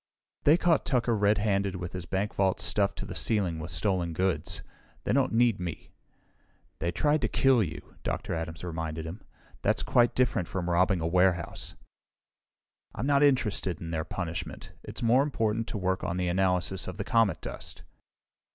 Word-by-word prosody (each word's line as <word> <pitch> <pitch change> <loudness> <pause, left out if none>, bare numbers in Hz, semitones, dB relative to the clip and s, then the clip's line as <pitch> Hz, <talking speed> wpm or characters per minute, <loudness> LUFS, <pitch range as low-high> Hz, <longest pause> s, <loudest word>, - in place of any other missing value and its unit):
"They 150 +3 +7
caught 170 -4 +3
Tucker 120 -3 +1
redhanded 100 -2 +1
with 90 -1 -5
his 90 -1 -6
bank 95 +5 -1
vault 95 -1 +1
stuffed 100 +3 +1
to - - -4
the - - -6
ceiling 95 -7 0
with 80 +1 -6
stolen 85 0 0
goods. 95 +2 0 0.4
They - - 0
don't 135 0 +2
need 115 -3 +3
me!" 90 -3 -6 0.9
"They 85 +1 0
tried 145 - +1
to 115 - +1
kill 130 +1 +4
you," 80 -6 -5
Dr. - - -3
Adams 80 0 -4
reminded 80 -2 -4
him. 90 +6 -7 0.4
"That's - - +1
quite 120 -1 +3
different 115 -8 +1
from 90 -2 -2
robbing 90 +1 +3
a - - -1
warehouse." 90 0 +1 1.2
"I'm - - -3
not 140 0 +3
interested 110 - +2
in 85 -1 -6
their 80 -1 -1
punishment. 85 -4 -5
It's - - -7
more 120 +3 +5
important 115 -5 0
to - - -4
work 95 -1 -1
on 90 0 -2
the 90 -1 0
analysis 90 0 +1
of - - -6
the - - -2
comet 115 -4 +2
dust." - - -7
95 Hz, 170 wpm, -28 LUFS, 85-115 Hz, 1.2 s, They